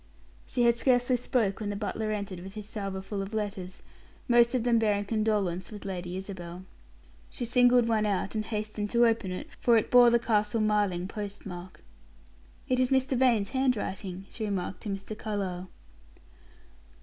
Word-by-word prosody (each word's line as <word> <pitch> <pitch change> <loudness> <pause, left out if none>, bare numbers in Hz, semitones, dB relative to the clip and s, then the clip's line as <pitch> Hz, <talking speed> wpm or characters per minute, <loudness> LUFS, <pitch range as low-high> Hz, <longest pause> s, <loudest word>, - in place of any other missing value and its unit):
She 245 - 0
had 235 0 +6
scarcely 245 +1 +2
spoke 235 -5 0
when 210 -2 -3
the 205 - -3
butler 215 +1 -3
entered 200 -3 -3
with 190 +3 -10
his 210 -1 -7
salver 195 -3 -4
full 195 0 -4
of 195 +3 -5
letters, 195 -4 -4 0.4
most 240 0 +5
of 245 - +1
them 235 -1 +3
bearing 205 -2 +1
condolence 205 -5 0
with 210 -2 -9
Lady 180 -1 -4
Isabel. 185 -2 -7 0.6
She 245 - -4
singled 245 +1 +5
out - - -2
one 215 -2 +2
and 205 +2 -1
hastened 210 -1 -3
to 240 +1 +4
open 225 -5 +1
it, 180 - -6
for 235 -1 +4
it 220 - 0
bore 245 -1 +8
the 235 - +5
Castle 215 -1 +1
Marling 205 -4 +1
post 205 0 -6
mark. 180 -1 -9 0.8
"It 255 - +1
is 255 -1 +3
Mrs. 265 -1 +2
Vane's 235 -6 +3
handwriting," 205 -8 -1
she 220 - -6
remarked 195 -3 -3
to 210 - -5
Mr. 195 +2 -5
Carlyle. 195 -4 -4
210 Hz, 175 wpm, -29 LUFS, 195-235 Hz, 0.8 s, bore